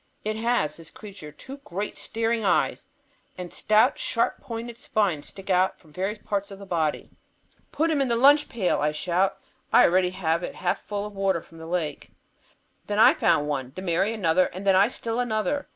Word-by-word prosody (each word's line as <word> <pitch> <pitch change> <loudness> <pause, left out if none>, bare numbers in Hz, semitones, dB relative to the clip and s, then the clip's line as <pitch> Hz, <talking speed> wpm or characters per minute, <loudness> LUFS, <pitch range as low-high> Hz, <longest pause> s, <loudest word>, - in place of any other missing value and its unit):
It 215 0 -1
has, 225 -9 0
this 165 -1 -7
creature, 195 -8 -11
two 265 - -10
great 205 -7 -5
staring 225 0 -1
eyes, 185 -3 +1 0.5
and 180 -1 -7
stout, 215 0 +3
sharp 230 - 0
pointed 235 0 -6
spines 195 -13 0
stick 195 0 -7
out 185 +1 +2
from 155 -3 -21
various 195 +5 -2
parts 200 -1 -3
of 195 - -9
the 200 - -10
body. 160 -5 -1 0.6
"Put 325 +2 +1
him 295 -3 +1
in 270 - +1
the 235 - +1
lunch 285 +5 +5
pail," 200 -6 0
I 150 +1 +1
shout. 180 +4 0 0.3
I - - +7
had - - +5
already 185 0 +3
filled 170 -3 -1
it - - -5
half 180 - -1
full 205 0 -4
of 210 - -8
water 195 -3 +1
from 165 - -16
the 160 - -9
lake. 165 -4 -3 0.8
Then 205 - -2
I 220 - +7
found 160 -4 +2
one; 135 -3 -3
then 185 - -6
Mary 180 +4 +1
another, 185 -5 +2
and 190 +3 -8
then 195 -1 +5
I 195 +2 +6
still 230 -1 -4
another. 245 +4 -1
195 Hz, 200 wpm, -25 LUFS, 170-225 Hz, 0.8 s, I